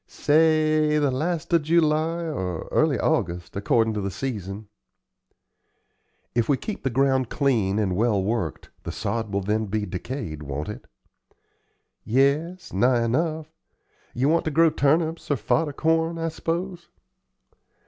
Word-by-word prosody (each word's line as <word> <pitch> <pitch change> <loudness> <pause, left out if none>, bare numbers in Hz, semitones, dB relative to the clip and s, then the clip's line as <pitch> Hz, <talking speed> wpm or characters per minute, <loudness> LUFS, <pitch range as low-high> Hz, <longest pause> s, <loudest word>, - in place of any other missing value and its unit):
"Say 155 0 +3
the 145 -2 +2
last 160 +5 -2
of 170 - +5
July 160 +1 +1
or 95 - -4
early - - +2
August, 85 0 -1
accordin' 110 +3 +2
to 105 - -2
the 100 - -2
season." 105 -3 -5 1.7
"If 115 -2 0
we 140 - +3
keep 215 - -6
the 135 - -1
ground 130 0 +1
clean 110 -9 +1
and 100 -4 0
well 110 0 +2
worked 100 - -3
the - - -5
sod 115 -3 -3
will 100 0 0
then 105 +2 -1
be 105 +1 -2
decayed, 90 - -5
won't 75 +1 -5
it?" - - -8 1.2
"Yes, 150 +8 0
nigh 120 +4 +3
enough. 155 +6 -1 0.6
Ye 125 +2 0
want 165 +3 +3
to - - +1
grow 160 +1 +4
turnips 160 +3 +1
or 145 - +3
fodder 160 +5 0
corn, 160 +3 +1
I 165 0 -1
s'pose?" 170 +2 -4
135 Hz, 140 wpm, -24 LUFS, 110-160 Hz, 1.7 s, of